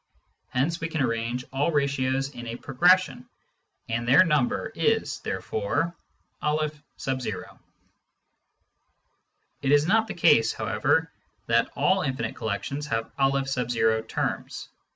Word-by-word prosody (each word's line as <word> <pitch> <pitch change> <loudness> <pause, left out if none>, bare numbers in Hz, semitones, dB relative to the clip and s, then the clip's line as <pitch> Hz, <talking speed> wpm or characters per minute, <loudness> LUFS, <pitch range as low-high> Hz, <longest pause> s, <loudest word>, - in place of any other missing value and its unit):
Hence 155 +7 0
we 165 - -1
can 160 -1 -4
arrange 120 0 -1
all 140 +5 +1
ratios 135 -2 0
in 120 -3 -8
a 115 - -4
progression, 135 -1 +2 0.6
and 120 +1 -2
their 145 +9 +7
number 150 -7 +1
is - - 0
therefore 145 +12 -2 0.5
M. 150 -3 -2 2.4
It 135 - +1
is 145 0 +5
not 220 +5 +3
the - - -5
case, 115 -9 +4
however, 120 +10 0 0.3
that - - +2
all 190 +1 +2
infinite 130 -8 -2
collections 135 +8 -3
have 115 -4 -2
N 125 -5 +1
terms. - - -3
135 Hz, 110 wpm, -26 LUFS, 120-150 Hz, 2.4 s, their